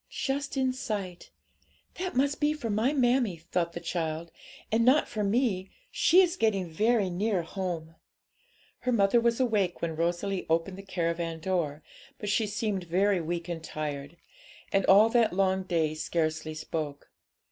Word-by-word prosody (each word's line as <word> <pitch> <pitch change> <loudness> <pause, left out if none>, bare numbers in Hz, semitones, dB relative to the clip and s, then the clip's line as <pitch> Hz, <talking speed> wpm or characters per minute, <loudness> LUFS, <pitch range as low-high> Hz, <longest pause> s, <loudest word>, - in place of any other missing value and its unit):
'Just 280 +1 -2
in 260 -1 +1
sight; 205 -8 -5 0.7
that 370 -4 -3
must 280 +3 +1
be 295 +1 +3
for 245 -8 -4
my 220 +6 +2
mammie,' 245 - +2
thought 170 -2 0
the - - -4
child, 165 -1 -3 0.4
'and 225 +1 +3
not 260 +5 +4
for 215 -2 -3
me; 200 -3 +1 0.2
she 365 +3 +5
is 355 -1 0
getting 200 - +1
very 210 +5 +2
near 185 +1 0
home!' 165 -3 -4 0.9
Her 250 - -1
mother 225 +1 +4
was 235 +1 +1
awake 210 -8 +1
when 165 -1 -2
Rosalie 175 +4 -1
opened 170 +4 0
the - - -6
caravan 170 -3 -2
door, 160 -4 -2 0.3
but 210 - -4
she 215 +1 +2
seemed 205 -3 -2
very 185 +2 +2
weak 170 +1 -3
and 165 -2 -5
tired, 150 0 -5 0.6
and 195 -1 +2
all 205 +3 +7
that 230 -4 +3
long 190 0 +2
day 165 -4 0
scarcely 155 0 -2
spoke. 155 -2 -5
190 Hz, 160 wpm, -28 LUFS, 165-230 Hz, 0.9 s, all